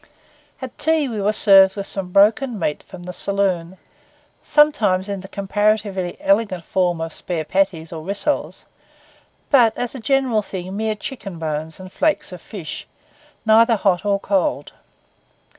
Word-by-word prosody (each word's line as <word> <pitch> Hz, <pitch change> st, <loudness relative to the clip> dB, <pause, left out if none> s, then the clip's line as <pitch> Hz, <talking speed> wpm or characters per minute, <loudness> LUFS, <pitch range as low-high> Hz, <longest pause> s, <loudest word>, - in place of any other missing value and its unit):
At 260 Hz, -2 st, -7 dB
tea 315 Hz, -2 st, +1 dB
we 220 Hz, -5 st, -4 dB
were 205 Hz, +2 st, +2 dB
served 195 Hz, -2 st, +6 dB
with 200 Hz, -1 st, -4 dB
some 195 Hz, -2 st, -4 dB
broken 220 Hz, +5 st, +3 dB
meat 150 Hz, -5 st, -2 dB
from 185 Hz, -2 st, -12 dB
the 180 Hz, 0 st, -7 dB
saloon; 190 Hz, -3 st, -1 dB, 0.7 s
sometimes 230 Hz, -11 st, +3 dB
in 200 Hz, -2 st, -4 dB
the 190 Hz, -, -10 dB
comparatively 200 Hz, -2 st, -1 dB
elegant 230 Hz, -, +1 dB
form 180 Hz, -3 st, 0 dB
of 165 Hz, -1 st, -4 dB
spare 165 Hz, -3 st, -3 dB
patties 185 Hz, -3 st, -1 dB
or 160 Hz, -, -6 dB
rissoles; 200 Hz, -, -2 dB, 0.9 s
but 235 Hz, -6 st, +5 dB
as 245 Hz, -1 st, -3 dB
a 265 Hz, -, -7 dB
general 260 Hz, -3 st, +1 dB
thing 190 Hz, -1 st, -7 dB
mere 220 Hz, +1 st, -1 dB
chicken 210 Hz, -5 st, -7 dB
bones 160 Hz, 0 st, -4 dB
and 185 Hz, 0 st, -10 dB
flakes 310 Hz, +3 st, 0 dB
of 180 Hz, -2 st, -9 dB
fish, 180 Hz, -8 st, -8 dB, 0.6 s
neither 225 Hz, +1 st, +5 dB
hot 190 Hz, -4 st, +1 dB
nor 200 Hz, -1 st, +1 dB
cold. 190 Hz, -8 st, -1 dB
200 Hz, 150 wpm, -20 LUFS, 180-220 Hz, 0.9 s, served